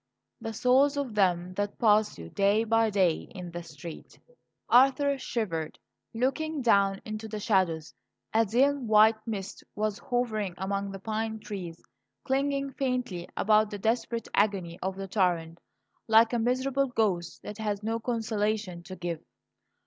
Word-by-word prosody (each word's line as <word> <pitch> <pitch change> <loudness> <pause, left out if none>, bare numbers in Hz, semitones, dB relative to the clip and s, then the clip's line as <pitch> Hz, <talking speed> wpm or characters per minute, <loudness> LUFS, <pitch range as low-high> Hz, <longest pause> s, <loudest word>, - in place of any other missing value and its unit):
"The 225 -1 -4
souls 265 +5 +3
of 275 -5 -2
them 180 -3 +1
that 205 0 -2
pass 215 -1 +3
you 85 -1 -9
day 200 +2 +3
by 225 0 +3
day 190 -5 +1
in 180 -2 -7
the 175 0 -5
street." 165 0 -10 0.5
Arthur 275 +3 +5
shivered, 165 -12 -3 0.3
looking 275 +5 -1
down 200 -4 +3
into 215 0 -5
the 215 -1 -5
shadows. 185 -7 +1 0.4
A 225 +1 +5
dim 260 +4 +2
white 220 +1 +5
mist 200 -2 -5
was 215 0 -1
hovering 215 -7 -1
among 195 +1 -2
the 195 - -6
pine 220 +2 -3
trees, 185 -6 -7 0.4
clinging 275 0 0
faintly 250 -10 -2
about 215 0 +4
the 205 - -5
desperate 230 +2 -1
agony 195 -5 +1
of 190 0 -2
the 195 0 -6
torrent, 175 -4 0 0.5
like 225 +1 +5
a 240 - +2
miserable 260 +3 +1
ghost 205 -8 -1
that 210 +1 -8
had 210 -1 -2
no 225 +1 -1
consolation 215 -5 -2
to 180 +2 -9
give. 175 -3 -4
215 Hz, 150 wpm, -28 LUFS, 190-235 Hz, 0.5 s, Arthur